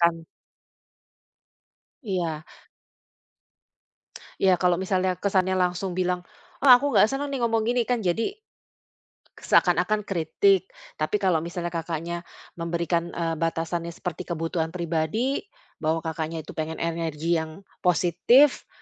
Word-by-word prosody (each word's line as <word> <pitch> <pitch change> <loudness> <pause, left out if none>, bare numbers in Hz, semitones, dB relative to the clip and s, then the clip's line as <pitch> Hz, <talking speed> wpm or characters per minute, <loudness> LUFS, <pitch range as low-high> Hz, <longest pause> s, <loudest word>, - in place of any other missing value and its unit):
Kan 165 -1 +2 1.8
Iya. 170 - -2 2.0
Ya, 185 -2 +5
kalau 180 -1 +3
misalnya 185 0 0
kesannya 190 0 +1
langsung 180 0 0
bilang, 180 -1 -1 0.4
"Ah, 255 -3 +9
aku 285 +2 -1
nggak 210 - +7
seneng 280 +1 -2
nih 275 - -2
ngomong 225 -1 +2
gini", 245 0 +2
kan 245 -2 0
jadi 210 - 0 1.1
seakan-akan 215 0 +2
kritik, 190 +1 +2 0.3
tapi 155 +6 0
kalau 185 -4 +3
misalnya 170 +1 -4
Kakaknya 170 +1 -4 0.3
memberikan, 170 0 -1
eee, 165 -1 -1
batasannya 165 +1 -2
seperti 180 +1 -6
kebutuhan 165 0 -2
pribadi, 170 - -1 0.3
bahwa 160 +1 0
Kakaknya 160 0 -4
itu - - -9
pengen 160 0 -2
energi 165 0 -1
yang 160 +5 -7 0.2
positif, 180 - +4
175 Hz, 115 wpm, -25 LUFS, 165-190 Hz, 2.0 s, Ah